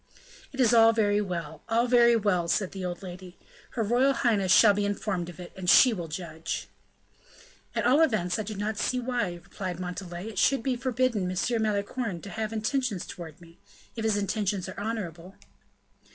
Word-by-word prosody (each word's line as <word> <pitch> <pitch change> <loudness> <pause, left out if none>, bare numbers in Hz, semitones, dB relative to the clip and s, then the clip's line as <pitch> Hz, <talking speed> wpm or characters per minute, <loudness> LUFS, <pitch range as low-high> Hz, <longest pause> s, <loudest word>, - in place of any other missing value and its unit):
"It 270 - -10
is 245 -3 +4
all 225 -1 +7
very 210 -2 +2
well! 170 -6 -5
all 230 +1 +3
very 240 -1 +5
well!" 200 -6 +1
said 190 +2 0
the 190 -1 -6
old 180 +1 -4
lady. 180 0 -9 0.4
"Her 230 - 0
royal 245 +6 +3
highness 210 -8 +1
shall 210 +1 +7
be 205 +1 -1
informed 200 -3 -2
of 175 - -12
it, 175 - -9
and 185 -2 -2
she 250 +5 +7
will 175 -5 -5
judge." 160 0 -5 1.1
"At - - 0
all 280 +5 +5
events, 215 - +1
I - - +1
do 215 0 -6
not 205 +1 -3
see 255 - 0
why," 240 -7 -1
replied 180 0 -6
Montalais, 180 +1 -6
"it 220 - -4
should 275 -4 +3
be 260 -1 0
forbidden 245 -6 0
M. 220 +5 0
Malicorne 210 -1 -2
to 200 - -8
have 220 0 -3
intentions 220 -2 -1
towards 160 -4 -9
me, 170 0 -17 0.4
if 225 - -4
his 220 -2 +2
intentions 200 -2 -1
are 190 - -7
honorable." 195 -4 -5
205 Hz, 185 wpm, -27 LUFS, 180-230 Hz, 1.1 s, all